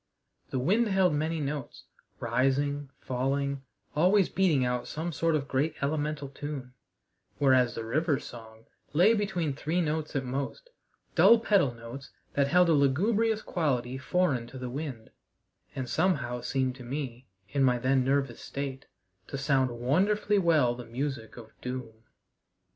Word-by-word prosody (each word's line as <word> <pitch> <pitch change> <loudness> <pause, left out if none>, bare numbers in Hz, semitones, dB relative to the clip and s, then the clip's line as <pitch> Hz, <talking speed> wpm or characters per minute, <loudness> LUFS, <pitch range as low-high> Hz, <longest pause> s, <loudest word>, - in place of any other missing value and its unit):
The - - -2
wind 205 - +2
held 190 -4 +3
many 160 +2 -1
notes, 145 -2 -4 0.4
rising, 135 +4 0
falling, 140 +2 -1 0.3
always 185 +5 +4
beating 165 -9 +2
out 125 0 -1
some 165 +3 -3
sort 165 +1 +1
of 140 -2 -1
great 145 +4 0
elemental 150 0 -1
tune; 135 -2 -6 0.6
whereas 130 -3 +4
the 115 - -4
river's 150 +4 0
song 110 -1 -11 0.3
lay 180 +9 +6
between 190 -8 -1
three 155 +5 -1
notes 155 -2 -1
at 135 -2 0
most 140 - -4 0.4
dull 235 - +7
pedal 200 - +3
notes, 115 +4 -9 0.2
that 140 -1 +2
held 180 +4 +5
a - - +5
lugubrious 210 - +2
quality 130 -6 -1
foreign 135 -5 0
to 130 - -10
the 125 -1 -5
wind, 135 -5 -6 0.6
and 130 -2 -3
somehow 125 -8 0
seemed 130 -1 0
to 125 - -10
me, 130 -1 -5 0.2
in 140 +3 +1
my 125 -2 +4
then 130 +2 +2
nervous 135 -2 0
state, 135 -1 -5 0.4
to 135 - -5
sound 135 -1 +2
wonderfully 190 - +1
well 155 -9 +3
the 125 0 -8
music 125 -1 -4
of 110 -2 -11
doom. 125 -3 -5
140 Hz, 150 wpm, -29 LUFS, 125-160 Hz, 0.6 s, dull